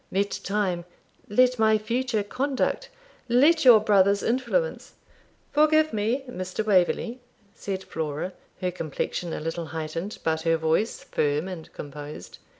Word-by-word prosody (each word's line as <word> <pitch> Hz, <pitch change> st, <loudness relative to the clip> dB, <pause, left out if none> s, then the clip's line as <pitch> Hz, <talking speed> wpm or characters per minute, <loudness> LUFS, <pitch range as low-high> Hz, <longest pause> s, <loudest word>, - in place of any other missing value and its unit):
Let 200 Hz, +1 st, 0 dB
time 190 Hz, -4 st, -1 dB, 0.4 s
let 250 Hz, +3 st, +3 dB
my 220 Hz, 0 st, +5 dB
future 230 Hz, 0 st, -1 dB
conduct 275 Hz, -, -1 dB, 0.4 s
let 295 Hz, +7 st, +5 dB
your 245 Hz, -4 st, +9 dB
brother's 200 Hz, -1 st, +3 dB
influence 265 Hz, -, -1 dB, 0.3 s
' -, -, -36 dB
'Forgive 310 Hz, 0 st, +4 dB
me, 220 Hz, +6 st, 0 dB
Mr. 185 Hz, -2 st, -4 dB
Waverley,' 210 Hz, +5 st, +2 dB, 0.3 s
said 190 Hz, -1 st, -5 dB
Flora, 160 Hz, +3 st, -4 dB, 0.3 s
her 180 Hz, -1 st, 0 dB
complexion 165 Hz, +1 st, -4 dB
a -, -, -3 dB
little 165 Hz, +1 st, -4 dB
heightened, 160 Hz, +5 st, -5 dB
but 160 Hz, -1 st, 0 dB
her 165 Hz, 0 st, +2 dB
voice 160 Hz, +8 st, 0 dB
firm 150 Hz, +3 st, 0 dB
and 175 Hz, -4 st, -8 dB
composed. 145 Hz, +1 st, -9 dB
200 Hz, 135 wpm, -26 LUFS, 165-245 Hz, 0.4 s, your